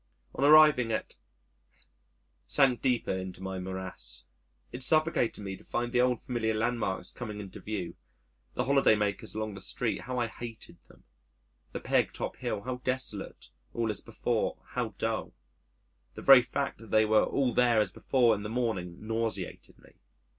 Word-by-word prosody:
On - - -2
arriving 150 -5 +7
at, - - -3 1.3
sank 135 -4 +3
deeper 125 -7 +1
into 95 -1 -6
my 95 0 -4
morass. 95 -8 -5 0.5
It 125 - -7
suffocated 155 -6 +2
me 95 -1 -5
to - - -16
find 120 0 -2
the 125 0 +3
old 125 -2 +2
familiar 110 -3 -2
landmarks 115 -3 -1
coming 105 -4 -7
into 100 -2 -8
view... 100 -5 -4 0.6
the - - 0
holiday 140 -4 +4
makers 105 +1 -2
along 110 -1 -3
the 100 - -8
streets - - 0
how 125 0 -4
I 120 - +1
hated 115 0 -9
them - - -20 0.7
the - - -4
Peg - - +1
Top - - -4
Hill 100 - -3
how 125 +3 -4
desolate 125 -5 -4 0.3
all 115 -2 0
as 105 - -3
before - - -2
how - - -3
dull. - - -2 0.8
The - - -8
very 135 -2 +9
fact 140 +3 -3
that 115 - -13
they 110 0 +4
were 110 0 +4
all 130 -3 0
there 120 -2 +4
as 105 -3 +1
before 125 +1 +2
in 100 - -3
the 105 - -5
morning 110 -6 -3
nauseated 110 -4 -3
me. - - -22
115 Hz, 165 wpm, -29 LUFS, 105-125 Hz, 1.3 s, very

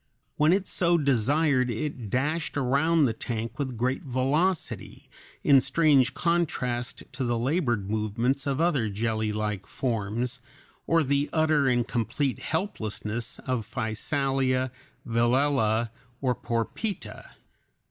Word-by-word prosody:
When 150 +2 +4
it 190 +1 +2
so 175 -1 +2
desired 140 0 +2
it 120 -1 -4
dashed 150 - -1
around 145 +4 +3
the 115 - +1
tank 115 +2 -4
with 130 -4 -3
great 130 +3 0
velocity, 145 +7 -1 0.4
in 140 -2 +6
strange 140 -1 +3
contrast 130 -8 -1
to 135 - -3
the 120 -1 0
labored 120 - 0
movements 115 +6 -1
of 140 0 0
other 150 -10 +2
jellylike 105 -1 -2
forms, 120 +2 -2 0.5
or 165 -1 +4
the 140 +1 +1
utter 155 -3 +3
and 120 -2 +2
complete 130 +3 -1
helplessness 120 - -3
of 125 -3 -1
Physalia, 130 +3 -1 0.4
Velella, 120 -1 +2 0.3
or 130 -2 +1
Porpita. 120 - -4
130 Hz, 115 wpm, -27 LUFS, 115-145 Hz, 0.5 s, in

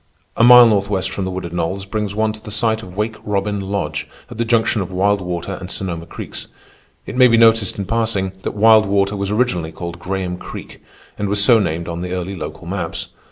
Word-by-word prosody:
A - - +2
mile 125 0 +10
northwest 100 -3 +1
from 95 0 -3
the - - -2
wooded 90 -2 -5
knolls 90 +3 -2
brings 105 0 -3
one 110 0 +1
to 110 0 -12
the - - -8
site 110 +1 0
of 95 -2 -11
Wake 110 +1 -2
Robin 100 0 -1
Lodge 95 -6 -3 0.2
at - - -9
the - - +2
junction 115 -2 +2
of 95 - -5
Wild 100 +2 +1
Water 90 +1 -4
and 90 - -7
Sonoma 85 -4 -3
Creeks. - - -8 0.6
It - - -7
may 125 0 +7
be 115 -1 +4
noticed, 115 -3 +4
in 100 - -3
passing, 110 -2 -1
that - - -4
Wild 110 0 +5
Water 100 0 +1
was 100 -1 -3
originally 100 -8 0
called 85 +1 -7
Graham 90 0 -3
Creek - - -10 0.4
and 100 -1 -1
was 100 0 +2
so 115 -1 +6
named 85 -4 -2
on 85 0 -4
the 90 0 -4
early 90 +1 -4
local - - -7
maps. - - -4
100 Hz, 215 wpm, -19 LUFS, 90-110 Hz, 0.6 s, mile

